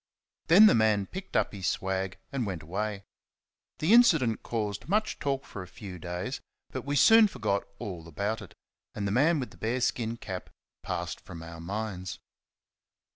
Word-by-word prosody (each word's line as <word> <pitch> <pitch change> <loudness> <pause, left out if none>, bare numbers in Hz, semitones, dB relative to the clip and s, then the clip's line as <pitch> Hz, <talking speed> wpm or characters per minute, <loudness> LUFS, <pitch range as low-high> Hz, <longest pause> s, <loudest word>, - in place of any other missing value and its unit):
Then 190 +6 +9
the 215 - +7
man 110 -3 +3
picked 190 - -4
up - - +1
his 95 -3 -3
swag 95 0 -1
and 125 -5 -1
went 90 -5 -4
away. 100 +4 -3 0.7
The 165 +8 +3
incident 160 - +5
caused 105 +1 -3
much 215 +2 +1
talk 135 -1 -1
for 100 - -7
a 90 - -8
few 95 -3 -9
days, 90 +9 -4 0.3
but 130 - -4
we 140 +3 -2
soon 225 - +7
forgot 110 - -1
all 85 -5 -6
about 100 +8 -2
it; 100 - -12 0.4
and 100 - -2
the - - -1
man 150 +8 +3
with 125 - -4
the - - -16
bear 115 +3 -1
skin 115 -2 -1
cap 95 -5 -6 0.3
passed - - -4
from 85 -2 -9
our 85 0 -9
minds. 95 +1 -4
110 Hz, 175 wpm, -29 LUFS, 95-135 Hz, 0.7 s, Then